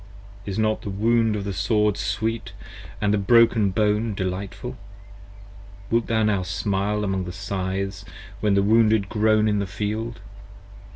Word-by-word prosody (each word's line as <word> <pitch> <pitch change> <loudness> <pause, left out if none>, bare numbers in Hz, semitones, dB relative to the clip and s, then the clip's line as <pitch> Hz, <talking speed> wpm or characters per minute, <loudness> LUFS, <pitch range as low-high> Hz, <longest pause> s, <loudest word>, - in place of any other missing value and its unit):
Is 95 - -3
not 110 0 +1
the - - -6
wound 110 +2 +2
of 100 - -3
the 100 0 -3
sword 105 +1 +1
sweet: 105 +4 -3 0.3
& - - -15
the 105 0 +2
broken 115 0 +4
bone 105 +2 0
delightful? 95 +7 -4 1.2
Wilt 115 0 +2
thou 110 -1 +1
now 105 -3 +2
smile 100 +3 -1
among 95 -2 -1
the 90 - -5
scythes 95 +1 -3 0.4
when 105 -2 +2
the 100 - +3
wounded 110 -1 +3
groan 110 0 +3
in 105 -1 +1
the 100 - -2
field? 110 +4 -4
105 Hz, 150 wpm, -23 LUFS, 100-110 Hz, 1.2 s, broken